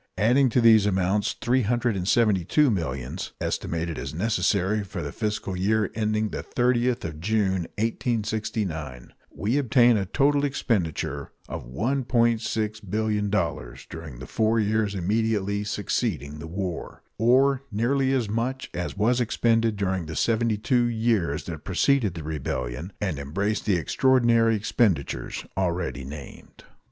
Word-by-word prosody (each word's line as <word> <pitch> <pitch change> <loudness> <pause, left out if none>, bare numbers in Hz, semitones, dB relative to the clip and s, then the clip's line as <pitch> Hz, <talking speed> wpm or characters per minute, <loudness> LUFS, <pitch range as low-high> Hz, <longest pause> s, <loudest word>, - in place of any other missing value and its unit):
Adding 125 +7 +4
to 120 +2 +2
these 110 -3 +6
amounts 95 +1 +1
three 125 +2 +1
hundred 120 0 0
and 90 -1 -3
seventy 105 -5 +3
two 145 - +3
millions, 70 - -3
estimated 85 -1 -2
as - - -5
necessary 105 0 +1
for 95 -3 -6
the 70 - -4
fiscal 105 -1 -3
year 105 +2 +1
ending 110 -1 0
the - - -4
30th 125 0 +1
of 75 -2 -6
June, 95 -2 0
1869, 105 - -2 0.2
we 115 +8 -1
obtain 120 -3 +4
a 95 -2 -2
total 140 +6 +2
expenditure 85 - -1 0.2
of - - -6
$1,600,000,000 110 - -1
during 80 -6 -8
the 65 - -8
four 110 - +1
years 105 -1 +1
immediately 100 +1 0
succeeding 75 -7 -2
the 80 - -7
war, 90 0 -5 0.2
or 130 +4 +4
nearly 130 +5 +1
as 130 -5 +1
much 120 +5 -2
as 90 +3 -4
was 120 +4 +2
expended 115 -1 +2
during 95 -4 -1
the 80 - -6
seventy 115 +1 +1
two 120 +3 +2
years 110 -10 0
that 80 -4 -7
preceded 105 0 +2
the 80 - -6
rebellion 75 0 -4
and 90 -8 -2
embraced 100 +11 -2
the 100 - +4
extraordinary 115 +3 +3
expenditures 100 - 0
already 85 -6 -1
named. 70 +1 -10
105 Hz, 135 wpm, -25 LUFS, 90-115 Hz, 0.2 s, these